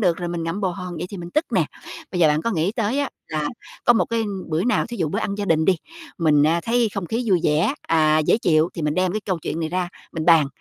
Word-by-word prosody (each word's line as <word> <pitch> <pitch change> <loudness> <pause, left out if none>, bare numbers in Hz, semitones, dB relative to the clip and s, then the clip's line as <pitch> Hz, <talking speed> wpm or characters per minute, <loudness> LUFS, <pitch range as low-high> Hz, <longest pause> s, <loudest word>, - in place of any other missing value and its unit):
được 180 -4 +1
là 175 - -2
mình 170 -1 -3
ngậm 165 +5 -3
bồ 190 -2 +1
hòn 180 0 -6
vậy 175 +3 -4
thì 200 - -6
mình 175 -1 -7
tức 305 - +1
nè. - - +3 0.5
Bây 180 - -2
giờ 160 - +6
bạn 150 +1 +1
có 230 - 0
nghĩ 175 +2 0
tới 225 +3 -1
á 285 -1 0 0.2
là 155 -2 -1 0.4
có - - +7
một 230 - +2
cái 230 -1 -1 0.2
bữa 160 +2 0
nào, 245 - +1
thí 240 - -7
dụ 165 -7 0
bữa 200 - -2
ăn 200 -3 -2
gia 205 0 -3
đình 160 -4 +2
đi, 190 +1 +4 0.4
mình, 150 -3 +4
ờ, 165 +3 +3
thấy 235 0 +2
không 195 -3 -3
khí 235 +5 -2
vui 185 -4 +4
vẻ, 155 - +2
ờ, 155 -1 +4
dễ - - +4
chịu 160 -5 +3
thì 165 - -4
mình 150 0 0
đem 185 +1 +1
cái 215 - -2
câu 190 -4 -2
chuyện 160 0 -4
này 160 - -1
ra 180 +1 -1 0.2
mình 160 -1 -3
bàn. 165 -4 +6
175 Hz, 290 wpm, -22 LUFS, 160-205 Hz, 0.5 s, có